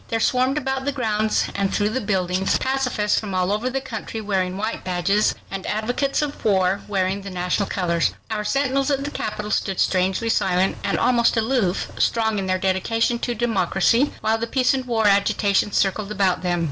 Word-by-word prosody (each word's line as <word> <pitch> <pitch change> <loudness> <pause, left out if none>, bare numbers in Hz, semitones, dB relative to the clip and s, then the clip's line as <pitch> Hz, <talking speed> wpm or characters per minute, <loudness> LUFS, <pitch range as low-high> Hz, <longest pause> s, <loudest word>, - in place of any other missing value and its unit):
There 225 - -1
swarmed 255 +4 +2
about 265 -2 -2
the 285 - +1
grounds 220 -5 0
and 195 -1 -1
through 205 0 +1
the 255 +4 -2
buildings 190 -2 0
pacifists 250 -6 0
from 200 -3 -5
all 185 +1 +1
over 215 +5 0
the 270 +1 -2
country 230 -3 -6
wearing 190 -3 -1
white 220 +3 -3
badges, 185 +3 +1 0.2
and 195 -1 -4
advocates 245 +7 0
of 290 -1 -5
war, 190 -1 +2
wearing 195 -1 -1
the 195 - -7
national 180 +2 -1
colors. 170 -3 0 0.2
Our 210 -1 -1
sentinels 275 +3 0
at 275 -1 0
the 290 - -4
Capitol 210 -3 -4
stood 195 -3 -1
strangely 190 +4 +1
silent, 190 -3 +1
and - - 0
almost 240 -1 +3
aloof, 225 -5 0
strong 220 -2 +1
in 190 - -3
their 185 0 +1
dedication 210 +6 0
to 240 0 -2
democracy, 225 - +2
while 220 +1 +1
the 230 - -2
peace 255 +2 +2
and 260 -1 -2
war 230 -3 0
agitation 200 0 +2
circled 200 +1 0
about 195 -3 +1
them. 175 -1 0
210 Hz, 185 wpm, -22 LUFS, 190-240 Hz, 0.2 s, almost